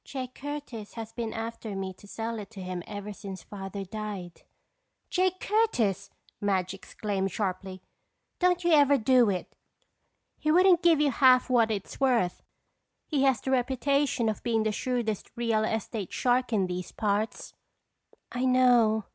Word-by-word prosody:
Jake 255 Hz, -2 st, -6 dB
Curtis 285 Hz, -8 st, -7 dB
has 225 Hz, -1 st, -7 dB
been 230 Hz, -2 st, -3 dB
after 225 Hz, -2 st, -5 dB
me 190 Hz, -1 st, -4 dB
to 205 Hz, -, -17 dB
sell 225 Hz, +2 st, -4 dB
it 205 Hz, -, -8 dB
to 200 Hz, -4 st, -9 dB
him 180 Hz, -1 st, -4 dB
ever 205 Hz, 0 st, -6 dB
since 195 Hz, -2 st, -8 dB
Father 195 Hz, 0 st, -6 dB
died." 200 Hz, -3 st, -6 dB, 0.7 s
"Jake 370 Hz, 0 st, +1 dB
Curtis!" 235 Hz, -, +1 dB, 0.3 s
Madge 190 Hz, -2 st, 0 dB
exclaimed 195 Hz, 0 st, -3 dB
sharply. 185 Hz, -1 st, -3 dB, 0.6 s
"Don't 360 Hz, -1 st, +2 dB
you 345 Hz, -, +2 dB
ever 285 Hz, -2 st, +6 dB
do 245 Hz, -1 st, +4 dB
it. 185 Hz, -2 st, -3 dB, 0.8 s
He 305 Hz, -, -1 dB
wouldn't 360 Hz, +1 st, +5 dB
give 335 Hz, -4 st, +5 dB
you 295 Hz, -2 st, +3 dB
half 255 Hz, 0 st, +5 dB
what 230 Hz, -3 st, +4 dB
it's 200 Hz, -3 st, -4 dB
worth. 240 Hz, -9 st, +2 dB, 0.6 s
He 290 Hz, -4 st, 0 dB
has 265 Hz, -5 st, +3 dB
the 265 Hz, -, -2 dB
reputation 265 Hz, 0 st, +1 dB
of 215 Hz, -, -2 dB
being 225 Hz, -2 st, +1 dB
the 215 Hz, -, +1 dB
shrewdest 225 Hz, -2 st, -2 dB
real 230 Hz, -2 st, +1 dB
estate 220 Hz, -3 st, -3 dB
shark 250 Hz, 0 st, +1 dB
in 205 Hz, -4 st, +2 dB
these 180 Hz, -1 st, -5 dB
parts." 210 Hz, +1 st, -2 dB, 0.8 s
"I 250 Hz, -, -2 dB
know. 245 Hz, -4 st, +4 dB
225 Hz, 155 wpm, -28 LUFS, 200-260 Hz, 0.8 s, ever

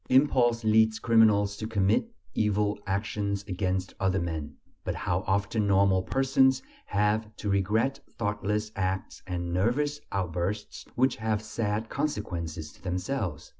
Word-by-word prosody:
Impulse 125 Hz, -3 st, +4 dB
leads 110 Hz, 0 st, +4 dB
criminals 105 Hz, -3 st, +4 dB
to 110 Hz, -, -4 dB
commit 110 Hz, -, +1 dB, 0.2 s
evil 105 Hz, -1 st, +1 dB
actions 100 Hz, 0 st, -1 dB
against 95 Hz, -1 st, -1 dB
other 95 Hz, 0 st, +1 dB
men; 80 Hz, -4 st, -4 dB, 0.3 s
but -, -, -2 dB
how -, -, 0 dB
often 100 Hz, +2 st, +1 dB
normal 95 Hz, -1 st, +4 dB
persons 130 Hz, +4 st, +3 dB, 0.2 s
have 105 Hz, +2 st, +1 dB
to 105 Hz, -, -3 dB
regret 105 Hz, +7 st, +1 dB, 0.2 s
thoughtless 105 Hz, 0 st, -1 dB
acts 95 Hz, 0 st, -2 dB
and 85 Hz, -1 st, -3 dB
nervous 145 Hz, +10 st, +1 dB
outbursts 95 Hz, +3 st, -3 dB
which 130 Hz, +1 st, +2 dB
have 110 Hz, -1 st, 0 dB
sad 110 Hz, 0 st, -2 dB
consequences 85 Hz, -, -3 dB
to -, -, -21 dB
themselves! 90 Hz, -, -3 dB
105 Hz, 130 wpm, -28 LUFS, 95-110 Hz, 0.3 s, Impulse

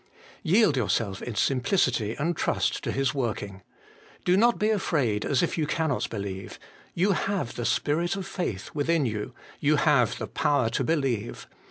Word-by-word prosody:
Yield 185 Hz, -2 st, +4 dB
yourself 105 Hz, -4 st, 0 dB
in 120 Hz, -, -5 dB
simplicity 125 Hz, -, +1 dB
and 170 Hz, +4 st, 0 dB
trust -, -, 0 dB
to -, -, -1 dB
His 135 Hz, 0 st, 0 dB
working. 105 Hz, -7 st, -3 dB, 0.6 s
Do 180 Hz, -, +4 dB
not 235 Hz, +4 st, +4 dB
be 215 Hz, +1 st, +2 dB
afraid, 140 Hz, -, 0 dB
as 140 Hz, +1 st, +1 dB
if 170 Hz, -, -1 dB
you 150 Hz, -, 0 dB
cannot 155 Hz, -3 st, -1 dB
believe: 100 Hz, -3 st, -6 dB, 0.4 s
you 190 Hz, +4 st, +2 dB
have 195 Hz, -7 st, -1 dB
'the 120 Hz, -, -4 dB
Spirit 170 Hz, +9 st, +1 dB
of 195 Hz, -1 st, -5 dB
faith 145 Hz, -, -4 dB
' -, -, -26 dB
within 155 Hz, 0 st, +1 dB
you: 105 Hz, -3 st, -4 dB, 0.2 s
you -, -, +3 dB
have -, -, +3 dB
the -, -, -4 dB
power 135 Hz, -6 st, +1 dB
to -, -, 0 dB
believe. 135 Hz, -9 st, -1 dB
140 Hz, 170 wpm, -26 LUFS, 115-175 Hz, 0.6 s, Yield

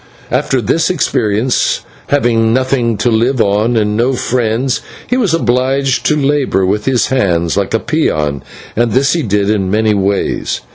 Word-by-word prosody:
After 130 Hz, -, 0 dB
this 160 Hz, +10 st, +1 dB
experience, 120 Hz, -, 0 dB, 0.3 s
having 115 Hz, -5 st, +2 dB
nothing 130 Hz, -3 st, 0 dB
to 115 Hz, +3 st, +1 dB
live 120 Hz, +4 st, +1 dB
on 110 Hz, +3 st, +1 dB
and 105 Hz, -1 st, 0 dB
no 120 Hz, +4 st, +1 dB
friends, 125 Hz, +1 st, -1 dB, 0.2 s
he 250 Hz, -, -1 dB
was 230 Hz, -9 st, +1 dB
obliged 130 Hz, -1 st, 0 dB
to 150 Hz, -, +2 dB
labour 140 Hz, -9 st, +1 dB
with 105 Hz, +3 st, -1 dB
his 130 Hz, -3 st, +1 dB
hands 85 Hz, -10 st, 0 dB
like 100 Hz, +2 st, -1 dB
a -, -, +2 dB
peon, 75 Hz, -, -1 dB, 0.3 s
and 115 Hz, -1 st, +1 dB
this 135 Hz, +3 st, +2 dB
he 170 Hz, -, 0 dB
did 105 Hz, -5 st, 0 dB
in 100 Hz, -3 st, 0 dB
many 110 Hz, +2 st, +2 dB
ways. 100 Hz, 0 st, -1 dB
120 Hz, 160 wpm, -14 LUFS, 105-135 Hz, 0.3 s, having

